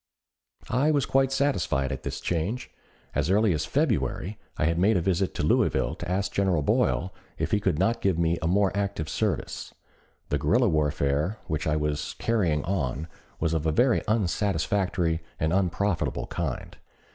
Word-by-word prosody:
I 135 +5 +3
was 145 -3 +2
quite 135 0 +2
satisfied 100 - +1
at 65 - -4
this - - -4
change. 90 +9 -2 0.4
As - - 0
early 105 0 +4
as 75 -1 -1
February 105 - 0 0.2
I - - +1
had 85 +1 +1
made 100 +3 +4
a - - +3
visit 95 +1 0
to - - -2
Louisville - - +2
to 85 - -7
ask 95 +2 0
General 95 -6 +1
Boyle 90 +5 +1 0.2
if - - -2
he 105 - +3
could 95 -6 0
not 115 +8 +1
give 95 -4 +2
me 85 0 +1
a 80 - 0
more 100 +2 +2
active 100 -6 -2
service. - - -2 0.5
The 75 - 0
guerrilla 115 - +3
warfare 75 +3 +1
which 80 -1 -2
I 75 - +2
was 75 -1 -2
carrying 90 -11 +1
on 80 -4 -2 0.3
was 80 0 0
of 80 -1 0
a - - +3
very 120 - +3
unsatisfactory 95 -4 0 0.2
and 80 +2 +1
unprofitable 95 0 0
kind. - - -4
90 Hz, 170 wpm, -27 LUFS, 80-105 Hz, 0.5 s, early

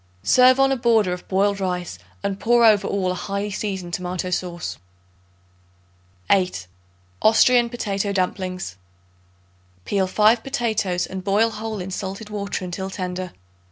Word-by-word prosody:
Serve 255 - +5
on 270 0 +4
a - - +2
border 225 -6 +2
of 180 - -8
boiled 200 +1 +1
rice 180 - -3 0.2
and 195 0 -2
pour 235 0 +4
over 210 -3 +5
all 190 -2 0
a - - -1
highly 200 +2 -3
seasoned 190 -4 -4
tomato 180 0 -3
sauce. 175 -1 -3 1.5
8. 180 - +1 0.6
Austrian 235 +2 +5
Potato 200 -4 -2
Dumplings. 185 - -2 1.1
Peel 195 -2 0
5 215 +4 +4
potatoes 220 -9 -1
and 190 0 -7
boil 210 +4 +2
whole 215 0 -5
in 185 +1 -5
salted 195 +3 -5
water 200 -2 -3
until 190 +2 -5
tender. 185 -1 -4
195 Hz, 135 wpm, -22 LUFS, 185-220 Hz, 1.5 s, Serve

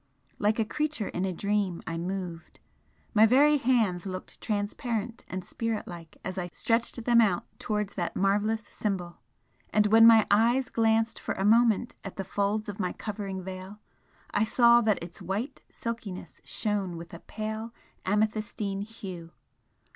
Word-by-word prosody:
Like 210 +1 +2
a 225 - +2
creature 300 -2 -2
in 180 - -2
a 190 - -1
dream 200 -1 -1
I 165 - -3
moved, 175 -1 -5 0.5
my 220 0 +7
very 290 +5 +5
hands 220 -8 +2
looked 185 -1 -7
transparent 220 +2 -2
and 185 -1 -5
spirit 230 +1 -3
like 170 -2 -10
as 185 0 -3
I 175 - -3
stretched 230 +3 0
them 235 -1 +6
out 195 -6 +2
towards 210 -2 -2
that 175 -3 -3
marvellous 210 +3 +1
Symbol! 180 -5 -4 0.5
and 210 0 +3
when 225 +2 +8
my 225 -2 +7
eyes 235 +5 +4
glanced 225 0 +2
for - - -3
a 195 - -1
moment 230 +1 +4
at 195 - -7
the 195 - -3
folds 205 +3 -1
of 205 -1 -6
my 180 -2 -1
covering 200 -3 -5
veil 190 +2 -7 0.6
I 205 - +3
saw 235 +1 +5
that 215 -6 +1
its 170 - -10
white 225 +9 -3
silkiness 215 -7 -6
shone 200 -5 -2
with 170 +1 -10
a 170 - -7
pale 220 +2 -5 0.3
amethystine 210 -1 -1
hue. 195 -6 -8
210 Hz, 155 wpm, -28 LUFS, 190-225 Hz, 0.6 s, when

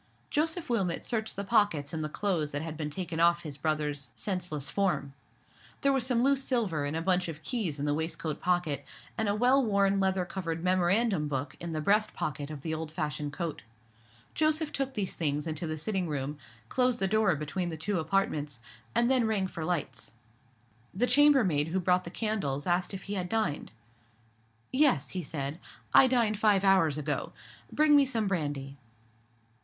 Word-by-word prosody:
Joseph 320 +3 0
Wilmot 195 -8 -1
searched 220 -2 -2
the 200 - -3
pockets 195 -9 +2
in 160 - -2
the 155 - -2
clothes 165 -5 -1
that 145 +2 -2
had 160 -1 -5
been 150 -1 -3
taken 170 0 -4
off 170 0 +4
his 150 -4 -5
brother's 150 -1 -2
senseless 180 -8 -3
form. 185 -8 0 0.7
There 275 0 +3
was 260 -2 +1
some 245 -2 +2
loose 275 0 +3
silver 205 - 0
and 145 +2 -3
a 165 - -2
bunch 180 0 +2
of 160 -1 -7
keys 190 - -2
in 145 - -1
the 145 - +1
waistcoat 160 0 -3
pocket, 175 -6 0 0.3
and 220 -3 0
a 200 - +1
well 255 +5 +4
worn 200 -3 +2
leather 190 -1 +1
covered 165 -3 -4
memorandum 185 -1 +2
book 140 0 -3
in 170 -1 -5
the 155 - -2
breast 210 +6 +2
pocket 145 -1 -3
of 150 -3 -8
the 160 - -2
old 160 -1 -4
fashioned 150 -2 -3
coat. 165 +2 -4 0.7
Joseph 310 0 +1
took 270 -1 -3
these 200 -4 -2
things 150 -2 -1
into 160 +1 -3
the 155 0 -3
sitting 185 +3 -1
room, 145 -1 -3 0.3
closed 250 - +2
the 195 - +1
door 210 -3 +3
between 155 +5 -3
the 160 - -5
two 180 +4 -1
apartments, 155 -6 -1 0.4
and 235 +1 +4
then 255 -3 +3
rang 210 -3 +1
for 170 -3 -5
lights. 145 -11 -2 0.8
The 230 +6 +2
chambermaid 245 - +4
who 180 +4 0
brought 180 0 +2
the - - -5
candles 180 -10 -2
asked 180 +2 0
if 190 - -7
he 200 - -5
had 180 -3 -2
dined. 215 -10 -1 1.0
"Yes," 280 0 +3
he 185 - -3
said, 145 0 -4 0.3
"I 265 - +8
dined 230 -5 +2
five 205 -3 +4
hours 190 -7 +4
ago. 150 -1 -3 0.4
Bring 300 0 +5
me 280 -2 +5
some 230 -4 0
brandy." 145 -6 -2
180 Hz, 185 wpm, -29 LUFS, 150-215 Hz, 1.0 s, I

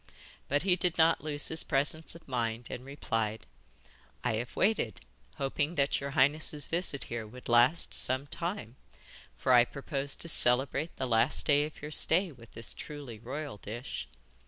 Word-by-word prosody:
But 145 +3 +1
he 185 -2 +3
did 180 -1 -1
not 165 -1 +3
lose 150 -1 0
his 160 - +5
presence 155 +3 -1
of 170 - -15
mind, 120 -2 -3
and 125 - -6
replied: 115 - -3 0.8
'I - - 0
have 120 +2 -6
waited, 195 - 0 0.3
hoping 145 +4 -2
that 140 -2 +1
your 140 - -4
highness' 145 +2 +4
visit 165 -5 -1
here 115 -2 -6
would 125 +4 -12
last 120 +7 +3
some 130 +2 +5
time, 165 - -5 0.6
for 130 - +2
I 120 -1 +7
proposed 140 +1 -4
to - - +2
celebrate 135 +2 +2
the - - -3
last 115 0 +3
day 145 -1 +3
of 150 -1 -11
your 150 - -6
stay 175 +4 +4
with 115 -5 -16
this 115 - -3
truly 140 -7 -9
royal 135 +1 -6
dish. 115 - -7
140 Hz, 165 wpm, -30 LUFS, 120-155 Hz, 0.8 s, I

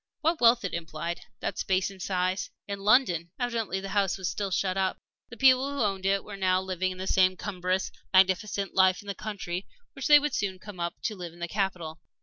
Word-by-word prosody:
What 325 -1 +1
wealth 235 -2 +5
it 185 - -4
implied 170 0 -4 0.2
that - - -3
space 190 +1 +1
and 190 -1 -12
size, 185 0 -1 0.2
in 200 -1 -4
London! 195 -6 +3
Evidently 230 -6 -1
the 195 0 -6
house 195 -2 +1
was 190 -2 -3
still 195 +5 -2
shut 185 0 0
up. 190 -1 0 0.3
The 235 - -10
people 265 +2 +5
who 280 - -4
owned 195 -2 -1
it 195 0 +2
were 205 - -8
now 185 -1 +2
living 185 0 -2
the 185 - -5
same 185 -1 +3
cumbrous, 185 -1 -2 0.2
magnificent 190 +1 +2
life 190 0 +4
in - - -17
the 200 - -2
country 190 -4 -5 0.3
which 275 -3 -3
they 295 - +9
would 295 -2 0
soon 190 -2 -1
come 195 -1 -11
up 170 0 -2
to 215 - -1
live 175 -3 -7
in 175 - -16
the 175 - -3
capital. 175 -5 -2
190 Hz, 215 wpm, -28 LUFS, 185-205 Hz, 0.3 s, they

